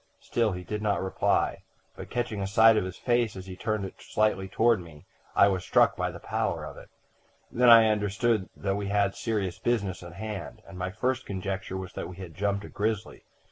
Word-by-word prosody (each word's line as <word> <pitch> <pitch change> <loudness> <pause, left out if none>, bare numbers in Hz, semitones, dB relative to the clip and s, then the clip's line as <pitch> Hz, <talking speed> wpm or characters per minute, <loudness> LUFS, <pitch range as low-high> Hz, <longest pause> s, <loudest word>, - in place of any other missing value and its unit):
"Still 115 -4 0
he 90 0 -6
did 105 +4 -4
not 105 -2 +1
reply; 95 0 0 0.3
but, - - -9
catching 120 -4 -2
a 95 - -1
sight 110 +2 +6
of 105 - +1
his 95 0 -6
face 120 -3 +1
as 95 -1 -8
he 95 -1 -8
turned 110 0 -2
it 95 - -10
slightly 105 -3 0
toward 115 +3 +3
me, 80 -4 -13 0.3
I 100 - +7
was 95 -3 0
struck - - +4
by - - -1
the - - -8
pallor - - -2
of - - -8
it. - - -13 0.6
Then 125 +1 +4
I 115 -1 +9
understood 105 0 +1
that 100 -1 -1
we 100 -1 -3
had 100 -1 +2
serious 100 -6 -2
business 100 -6 -1
on 85 -1 -10
hand, 110 +2 -6
and 95 - -11
my 90 0 -2
first 130 +7 -2
conjecture 95 -1 -4
was 95 -1 -7
that - - -5
we 90 - -9
had 90 -4 -8
'jumped' 100 +2 -1
a - - -10
grizzly. 105 0 -3
100 Hz, 215 wpm, -28 LUFS, 95-110 Hz, 0.6 s, I